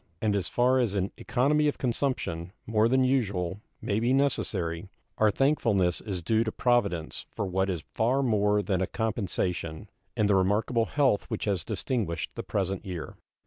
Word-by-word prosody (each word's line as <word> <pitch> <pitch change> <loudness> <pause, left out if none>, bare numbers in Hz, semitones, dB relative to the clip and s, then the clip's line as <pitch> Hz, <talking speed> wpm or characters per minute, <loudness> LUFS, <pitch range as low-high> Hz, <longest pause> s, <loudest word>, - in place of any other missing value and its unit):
And 105 -2 +1
as 100 -3 -1
far 125 +2 +3
as 115 -5 +1
an 95 0 0
economy 140 +5 +2
of 145 - 0
consumption, 115 -9 -2
more 110 0 +2
than 130 +1 +3
usual, 100 -8 0 0.2
may 100 - 0
be 120 +3 +2
necessary, 95 -10 0 0.3
our 110 - +5
thankfulness 105 - +2
is 95 -5 -4
due 110 +5 +2
to 110 - -2
Providence 100 -11 0
for 100 - -3
what 95 +1 0
is 85 -4 -3
far 125 +5 +2
more 105 -3 +2
than 95 -1 0
a 95 - +1
compensation, 95 -5 -2 0.3
in 110 - +3
the 100 - +3
remarkable 105 +5 +2
health 135 -8 +2
which - - -4
has 100 -5 0
distinguished 105 - -2
the - - -5
present 95 -1 -2
year. 90 -4 -6
105 Hz, 170 wpm, -28 LUFS, 95-120 Hz, 0.3 s, our